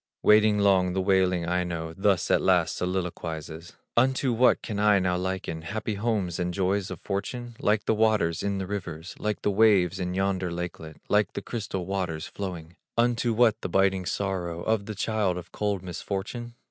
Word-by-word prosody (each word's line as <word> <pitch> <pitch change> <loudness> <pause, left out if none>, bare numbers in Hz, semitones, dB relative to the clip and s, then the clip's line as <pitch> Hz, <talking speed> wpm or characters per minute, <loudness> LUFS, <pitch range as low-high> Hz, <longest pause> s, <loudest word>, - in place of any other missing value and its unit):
Waiting 105 0 +5
long 95 -3 +3
the 95 - 0
wailing 95 -2 +2
Aino 85 -2 -2
Thus 95 -1 +1
at - - +4
last - - +3
soliloquizes: 85 -3 -4 0.2
"Unto 130 +1 +2
what 125 +2 +4
can 105 -2 -4
I 105 -1 +5
now 90 -1 +1
liken 90 -3 -3
Happy 105 +6 -3
homes 100 -5 -1
and 90 0 -1
joys 95 0 0
of - - -6
fortune? 120 +4 -4
Like 105 +1 +1
the - - +2
waters 105 -7 +2
in 100 -1 -1
the 95 - -3
river, 90 -5 -5 0.2
Like 105 0 -2
the 105 - +2
waves 95 -3 +4
in 90 0 -2
yonder 95 -1 0
lakelet, 85 -2 -6
Like 105 -2 +2
the - - -5
crystal 100 -6 -4
waters 95 -5 -2
flowing. 90 -4 -7 0.2
Unto 120 0 +2
what, 115 -1 +3
the - - -3
biting 95 -2 +2
sorrow 90 -4 -2
Of 110 -2 0
the 110 - -5
child 105 -3 0
of 90 0 -8
cold 100 -3 -2
misfortune? 100 +6 -5
95 Hz, 175 wpm, -27 LUFS, 90-105 Hz, 0.2 s, Waiting